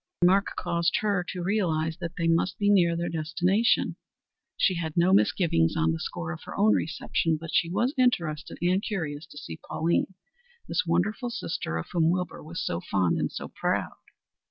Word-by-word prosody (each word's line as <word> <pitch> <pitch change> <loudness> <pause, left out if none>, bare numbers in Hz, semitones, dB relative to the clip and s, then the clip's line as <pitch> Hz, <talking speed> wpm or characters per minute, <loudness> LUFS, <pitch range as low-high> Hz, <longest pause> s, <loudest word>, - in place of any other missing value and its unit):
His 175 - +4
remark 195 +3 +3
caused 170 -1 0
her 200 -4 +1
to 180 -3 -4
realize 165 -5 0
that 170 -2 -5
they 165 -1 0
must 165 +2 +1
be 205 0 +3
near 170 -4 +4
their 170 0 -1
destination. 180 +7 +1 0.6
She 190 - +3
had 165 -2 -4
no 175 +2 +4
misgivings 160 - +3
on 80 0 +2
the 80 - -2
score 80 +1 -4
of 80 - -7
her - - -7
own 215 +2 +5
reception, 160 +1 0
but 165 0 -7
she 165 - +2
was 240 +9 0
interested 170 - +1
and 185 +2 +2
curious 160 -7 -4
to 145 - -14
see 80 - -7
Pauline, 170 +3 -1 0.5
this - - 0
wonderful 215 +9 0
sister 165 - -3
of 80 - -4
whom 165 -2 +3
Wilbur 180 +1 -2
was 160 +2 -5
so 85 - -2
fond 90 -3 +1
and - - -1
so - - -6
proud. - - -1
170 Hz, 185 wpm, -27 LUFS, 155-190 Hz, 0.6 s, own